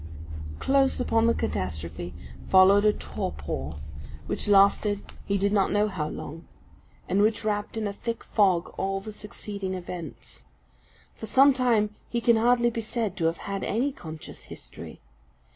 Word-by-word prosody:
Close 270 - +2
upon 225 -2 +2
the 230 - +4
catastrophe 85 0 -3 0.4
followed 195 +2 +6
a 210 - +5
torpor, 75 - -4 0.5
which - - -3
lasted 200 0 +4 0.2
he 200 - +1
did 200 +1 +1
not 195 -2 +3
know 205 +1 +3
how 160 -7 -3
long, 160 +3 -8 0.6
and 195 +2 +2
which 215 +1 +2
wrapped 210 +1 -1
in 220 - -1
a 200 - -2
thick 230 +3 -4
fog 185 -5 +2
all 195 0 0
the 215 +2 -8
succeeding 200 -2 -5
events. 175 -2 -8 0.7
For 220 - -8
some 270 +5 +6
time 230 -5 +2 0.2
he 235 - 0
can 235 -1 +4
hardly 240 +1 +3
be 230 - -3
said 220 -3 -2
to 165 - 0
have 165 +1 +1
had 195 -1 -3
any 250 +7 0
conscious 160 - -9
history. - - -10
205 Hz, 155 wpm, -27 LUFS, 185-225 Hz, 0.7 s, followed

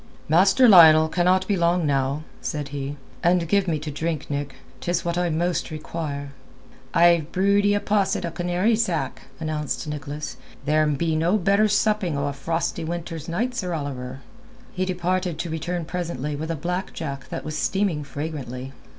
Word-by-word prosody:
"Master 195 - +5
Lionel 160 -6 +9
cannot 180 +3 +2
be 205 - +2
long 170 -1 +2
now," 140 +1 0 0.2
said 150 -2 -3
he. 140 0 -5 0.2
"And 175 -1 +3
give 200 +2 +2
me 160 -3 +1
to 150 0 -5
drink, 155 0 -3
Nick. 140 -2 -3 0.2
'Tis 175 0 -1
what 170 0 0
I 175 0 +1
most 170 +2 0
require." 150 -3 -5 0.6
"I've 170 -2 +4
brewed 200 +2 +3
ee 205 - +3
a - - +2
posset 200 -3 +1
o' 170 - -3
canary 180 +6 +1
sack," 215 -8 -2
announced 155 -1 -3
Nicholas; 150 0 -5 0.3
"there'm 150 -1 +2
no 165 +4 +2
better 200 +2 +3
supping 210 -6 +1
o' 140 - -1
a 145 - -2
frosty 165 +4 -2
winter's 165 -1 -5
night, 235 +9 -1
Sir 180 -8 -2
Oliver." 135 -3 -5 0.5
He 185 0 -1
departed 180 -2 -1
to 165 0 -4
return 165 +2 -3
presently 155 -5 -3
with 160 +3 -5
a 165 - -1
black 180 +5 -3
jack 140 -4 -6
that - - -5
was 155 0 -4
steaming 190 -2 0
fragrantly. 135 -3 -6
165 Hz, 165 wpm, -24 LUFS, 150-180 Hz, 0.6 s, Lionel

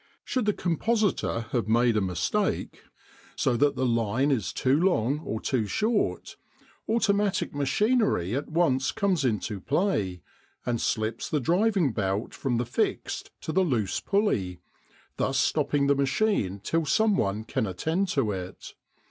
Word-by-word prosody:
Should 255 -4 -1
the 210 - +2
compositor 195 - 0
have 115 -5 0
made 115 +1 +3
a 105 - +2
mistake, 90 -3 -1 0.5
so 130 - +1
that 145 +3 +3
the 130 - 0
line 115 +3 +1
is 115 -8 0
too 130 +1 +1
long 150 - +2
or 110 -8 -4
too 115 -4 -1
short, 215 - -1 0.5
automatic 205 -3 +1
machinery 145 - +1
at 140 - -3
once 135 -5 +2
comes 195 -8 0
into 105 -4 -1
play, 105 - 0 0.4
and 120 -2 -1
slips 110 +1 -1
the 150 - +1
driving 180 - +2
belt 100 +1 -2
from 125 -4 -1
the 120 - 0
fixed 120 - -2
to - - -4
the 190 - +2
loose 120 - 0
pulley, 100 - 0 0.6
thus 135 0 0
stopping 145 0 +1
the 140 - +4
machine 140 - 0
till 165 0 0
some 220 +3 +3
one 105 - -1
can 110 - -2
attend 160 - -1
to 135 - 0
it. 95 -2 -7
135 Hz, 150 wpm, -27 LUFS, -, 0.6 s, the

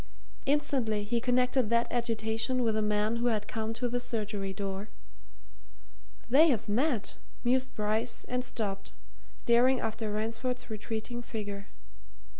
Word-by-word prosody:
Instantly 265 -7 +2
he 230 +3 0
connected 250 -1 +2
that 235 0 +3
agitation 230 +1 0
with 225 -2 +2
the 215 - +1
man 210 +2 +1
who 240 +1 +1
had 215 -3 0
come 220 0 -2
to 235 +2 -1
the 245 +1 -1
surgery 210 -5 -3
door. 195 +1 -4 1.4
"They've 265 -3 +5
met!" 235 +1 0 0.2
mused 255 +1 +1
Bryce, 220 +2 0
and 250 0 -2
stopped, 200 -6 -2 0.4
staring 245 +2 +4
after 220 -1 -2
Ransford's 230 +3 -2
retreating 220 +3 -4
figure. 205 -3 -5
225 Hz, 125 wpm, -30 LUFS, 210-245 Hz, 1.4 s, They've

